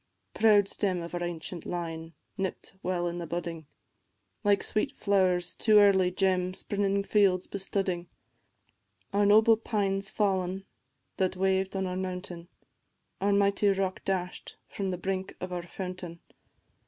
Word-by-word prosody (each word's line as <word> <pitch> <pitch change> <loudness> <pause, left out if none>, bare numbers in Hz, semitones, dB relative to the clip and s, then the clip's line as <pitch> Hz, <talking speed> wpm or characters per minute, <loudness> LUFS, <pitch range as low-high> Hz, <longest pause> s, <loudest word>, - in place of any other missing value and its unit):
Proud 210 -3 +5
stem 185 -4 0
of 170 - -8
our 175 0 -2
ancient 175 0 -5
line, 165 -2 -5 0.2
nipt 190 -1 -4
while 180 -1 -1
in 175 0 -4
budding, 165 -2 -5 0.8
Like 205 -1 +3
sweet 215 +6 -1
flowers' 185 -3 +2
too 215 -2 +4
early 195 -3 +6
gem 185 0 +1
spring 200 0 0
fields 195 -3 +3
bestudding, 190 -3 -2 1.1
Our 205 0 +3
noble 220 +2 +6
pine 200 -3 -1
's 195 - -5
fall'n, 190 -2 0 0.5
that 185 -1 0
waved 190 0 +1
on 190 0 0
our 180 0 -3
mountain, 180 -2 -5 0.7
Our 200 +1 +2
mighty 200 +1 +3
rock 195 -1 -1
dash'd 180 -2 -3
from 195 -1 -3
the 180 - -2
brink 190 +1 -3
of 185 0 -5
our 175 - -2
fountain. 180 -1 -7
190 Hz, 140 wpm, -29 LUFS, 180-200 Hz, 1.1 s, early